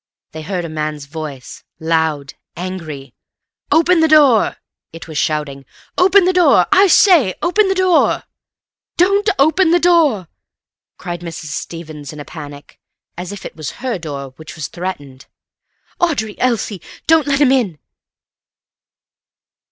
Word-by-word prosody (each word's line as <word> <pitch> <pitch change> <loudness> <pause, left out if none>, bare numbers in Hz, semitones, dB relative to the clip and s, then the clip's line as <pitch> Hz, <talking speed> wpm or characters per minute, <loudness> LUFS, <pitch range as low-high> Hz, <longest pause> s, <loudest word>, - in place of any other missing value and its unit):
They 160 - -8
heard 180 +1 -4
a - - -4
man's 155 -2 -4
voice, 145 -4 -8 0.2
loud, 160 -4 -1 0.2
angry. 160 -8 -7 0.6
"Open 335 +2 +4
the 320 - +4
door!" 290 -8 +4 0.3
it 165 +1 -10
was 160 - -9
shouting. 150 -3 -2 0.3
"Open 380 +1 +5
the 370 - +2
door! 360 -1 +4
I 395 +1 +6
say, 330 - +5
open 395 +4 +2
the 385 - 0
door!" 370 -2 +2 0.7
"Don't 395 +4 +3
open 320 +5 +3
the 350 +1 +4
door!" 315 - +3 0.7
cried 175 -2 -6
Mrs. 165 -2 -7
Stevens 155 -4 -7
in 150 - -10
a 145 - -8
panic, 145 -3 -11 0.4
as 180 +2 -6
if 200 -1 -9
it - - -8
was 155 -3 -6
her 245 -7 -2
door 140 -4 -6
which 155 0 -11
was 155 -4 -6
threatened. 145 -8 -7 0.7
"Audrey! 235 -12 -1
Elsie! 225 -6 -1 0.2
Don't 320 -2 +3
let 280 -1 +1
him 285 -3 +4
in!" 230 - +1
180 Hz, 140 wpm, -17 LUFS, -, 0.7 s, I